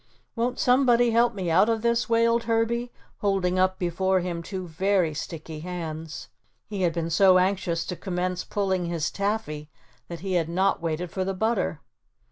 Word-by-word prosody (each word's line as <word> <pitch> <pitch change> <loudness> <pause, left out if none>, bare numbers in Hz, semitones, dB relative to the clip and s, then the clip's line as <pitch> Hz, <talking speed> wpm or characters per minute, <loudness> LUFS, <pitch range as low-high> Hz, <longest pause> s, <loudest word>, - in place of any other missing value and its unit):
"Won't 245 +1 -1
somebody 245 -2 +4
help 235 0 +3
me 185 -4 -2
out 190 +7 +5
of 225 -1 0
this?" 235 0 +1
wailed 230 0 +3
Herbie, 235 +1 0 0.3
holding 190 -3 +1
up 185 0 +2
before 185 +2 +1
him 175 -1 -3
two 185 +1 -5
very 180 0 +1
sticky 155 0 -6
hands. 160 -2 -6 0.4
He 205 -3 -5
had 175 -2 +3
been 165 0 -3
so 185 +2 +6
anxious 180 -3 0
to 180 - -4
commence 180 0 -2
pulling 190 -3 -1
his 165 -2 -1
taffy 200 -8 -2 0.4
that 170 -2 -7
he 190 0 -3
had 165 -2 +1
not 190 +2 +1
waited 165 +1 -3
for 190 - -2
the 190 +1 -2
butter. 220 +5 0
185 Hz, 170 wpm, -26 LUFS, 170-220 Hz, 0.4 s, so